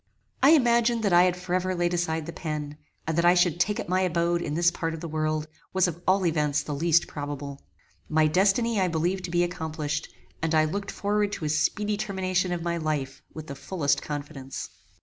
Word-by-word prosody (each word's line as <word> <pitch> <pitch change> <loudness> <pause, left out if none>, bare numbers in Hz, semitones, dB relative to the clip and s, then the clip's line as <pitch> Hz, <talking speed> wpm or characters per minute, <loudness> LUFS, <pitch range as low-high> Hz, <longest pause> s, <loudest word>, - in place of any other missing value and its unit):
] - - -45
I 280 +4 +7
imagined 235 -4 +3
that 200 -4 +2
I 175 +1 +7
had 180 -1 +1
forever 185 +1 -1
laid 175 0 0
aside 160 -2 -1
the 170 - -7
pen; 150 -2 -5 0.3
and 160 - -1
that 170 - +2
I 175 +1 +6
should 175 -2 +2
take 205 +3 +1
up - - -4
my 185 +2 +1
abode 170 -1 +1
in 150 -3 -3
this 175 +1 +4
part 165 -1 -3
of - - -8
the 170 - -5
world, 155 0 -1 0.3
was 190 -1 +3
of 175 0 -5
all 190 0 +3
events 150 -3 +1
the 150 - -4
least 165 +3 +3
probable. 145 -1 -6 0.5
My 155 0 +3
destiny 195 +7 +2
I 185 - +3
believed 175 +3 -1
to - - -6
be 175 0 +2
accomplished, 155 -3 -3 0.3
and 160 0 +1
I 155 0 +5
looked 195 +5 -3
forward 205 0 0
to 155 - -4
a - - 0
speedy 205 +7 0
termination 185 -3 -1
of 175 -2 -2
my 170 0 -1
life 150 -4 -3
with 155 -1 -8
the 140 - -7
fullest 145 0 -1
confidence. 145 -2 -6
170 Hz, 215 wpm, -26 LUFS, 155-185 Hz, 0.5 s, I